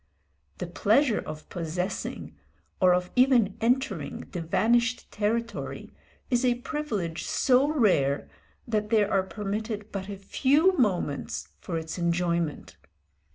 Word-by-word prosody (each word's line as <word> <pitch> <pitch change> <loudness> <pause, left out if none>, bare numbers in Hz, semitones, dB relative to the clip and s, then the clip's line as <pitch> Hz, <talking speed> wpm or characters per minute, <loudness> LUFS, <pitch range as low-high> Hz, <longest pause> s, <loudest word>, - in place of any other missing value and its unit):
The - - -4
pleasure 215 +8 +2
of 155 0 -8
possessing, 180 +2 -4 0.4
or 185 -1 +5
of 180 0 -2
even 250 -6 +4
entering, 230 - -1
the 175 - -4
vanished 230 +8 +1
territory 230 +3 -2 0.4
is 245 0 +2
a 245 -1 +3
privilege 240 - -3
so 265 +1 +3
rare, 190 - +2 0.4
that 215 -2 -1
there 215 -2 +3
are 195 - +4
permitted 210 +2 -4
but 195 0 -5
a 200 - -5
few 285 - +3
moments 185 - -1
for 170 - -4
its 160 +2 -5
enjoyment. 170 -2 -1
210 Hz, 120 wpm, -27 LUFS, 175-240 Hz, 0.4 s, or